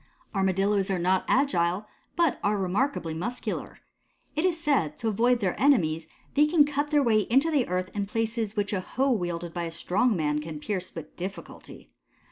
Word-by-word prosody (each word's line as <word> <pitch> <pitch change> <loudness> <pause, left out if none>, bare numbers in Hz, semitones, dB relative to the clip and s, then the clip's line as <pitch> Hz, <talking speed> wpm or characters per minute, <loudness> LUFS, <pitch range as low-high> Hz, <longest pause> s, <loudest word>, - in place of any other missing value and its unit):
Armadillos 195 +1 +1
are 190 - +1
not 185 +2 +2
agile 205 -8 +2 0.3
but 335 -5 +2
are 205 +1 +2
remarkably 190 - -1
muscular. 235 +10 -4 0.5
It 310 +4 +1
is 335 -3 -1
said, 270 - +1
to 225 - -1
avoid 235 +3 +2
their 185 -3 +1
enemies 165 - +3 0.3
they 295 +1 +4
can 305 -2 +5
cut 290 0 -1
their 295 -2 +3
way 225 -4 +4
into 270 +7 +3
the 280 -5 +2
earth 185 +1 -2
in 205 -1 -2
places 225 0 -2
which 205 0 -1
a 190 - 0
hoe 265 +8 0
wielded 175 -5 -2
by 175 -1 -2
a 165 - -5
strong 205 +8 +1
man 150 -1 0
can 155 -1 -7
pierce 185 +2 -4
with 160 -2 -8
difficulty. 175 - -8
205 Hz, 180 wpm, -27 LUFS, 175-260 Hz, 0.5 s, can